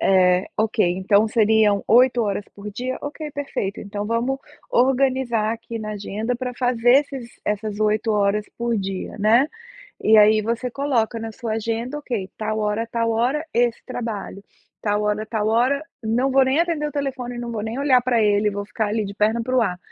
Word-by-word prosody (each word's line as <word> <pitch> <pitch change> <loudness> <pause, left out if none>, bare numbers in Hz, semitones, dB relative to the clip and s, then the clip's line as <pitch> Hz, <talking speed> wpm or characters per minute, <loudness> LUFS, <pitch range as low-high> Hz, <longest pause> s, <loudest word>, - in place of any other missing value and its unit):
eh, 185 -1 +4
ok, 220 -1 +2
então 200 +3 +3
seriam 215 -2 +3
8 245 +1 +5
horas 205 -1 -2
por 205 +1 -8
dia, 250 +5 -4
ok, 300 +1 -6
perfeito. 275 -8 -4
Então 205 0 -5
vamos 240 +4 0 0.3
organizar 255 -3 +2
aqui 230 0 -7
na 215 -1 -5
agenda 215 +4 -3
para 250 -1 -4
fazer 245 +2 +3
esses 255 -4 -10
essas 210 0 -2
8 215 +1 +1
horas 205 0 +1
por 235 -1 -1
dia, 195 -1 -4
né, 230 +7 +4 0.6
e, 220 0 +5
aí, 215 +1 +6
você 235 +3 -2
coloca 240 -4 0
na 225 0 -5
sua 225 0 -5
agenda: 230 +5 -3
"Ok, 235 -9 -3
tal 215 0 -2
hora 210 +2 0
a - - -12
tal 230 0 -1
hora, 250 +7 0
esse 240 0 +1
trabalho. 225 -5 -5 0.4
Tal 210 0 0
hora 210 +1 0
a - - -20
tal 215 -2 -2
hora, 255 +6 +2 0.2
não 240 +5 +1
vou 270 0 +5
nem 265 +4 +2
atender 330 -3 0
o - - -10
telefone, 265 -4 -3
não 240 -1 -5
vou 215 - -3
nem 225 +4 -4
olhar 275 -3 +4
para 240 -2 +1
ele, 210 0 +3
vou 205 0 -4
ficar 220 +1 -2
ali 215 0 -1
de 200 - -6
perna 220 +3 +1
para 255 +2 -2
o 250 - +4
ar. 180 -5 0
225 Hz, 195 wpm, -22 LUFS, 210-250 Hz, 0.6 s, aí